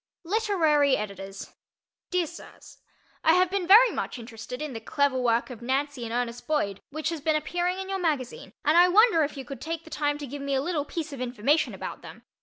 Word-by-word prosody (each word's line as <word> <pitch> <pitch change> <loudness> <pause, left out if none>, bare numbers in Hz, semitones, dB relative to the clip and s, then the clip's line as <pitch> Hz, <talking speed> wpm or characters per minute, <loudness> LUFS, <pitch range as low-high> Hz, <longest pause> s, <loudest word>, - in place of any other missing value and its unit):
Literary 330 -8 +2
Editors: 195 -1 -7 0.6
Dear 360 -1 +1
Sirs: 340 +2 -13 0.4
I 320 - +5
have 365 0 +3
been 385 -3 -1
very 455 +6 +8
much - - -4
interested 235 +1 -8
in 300 -3 -4
the 225 - -5
clever 275 +3 0
work 235 +1 +1
of 240 -2 -9
Nancy 270 +1 -1
and 225 - -6
Ernest 245 0 -3
Boyd 205 -11 -1
which 310 +3 -3
has 330 -3 -4
been 310 +1 +1
appearing 350 +4 -1
in 380 0 -5
your 385 0 -2
magazine, 285 - -2
and 305 +2 +4
I 355 - +7
wonder 390 -3 +5
if 290 0 -4
you 270 - -6
could 275 +2 -8
take 330 0 -4
the 320 - -15
time 290 -1 0
to 295 - -6
give 280 +2 -7
me 280 0 -1
a 265 - +1
little 320 -4 -1
piece 310 -1 -5
of 265 - -7
information 255 +5 +1
about - - -7
them. - - -12
290 Hz, 215 wpm, -27 LUFS, 250-340 Hz, 0.6 s, very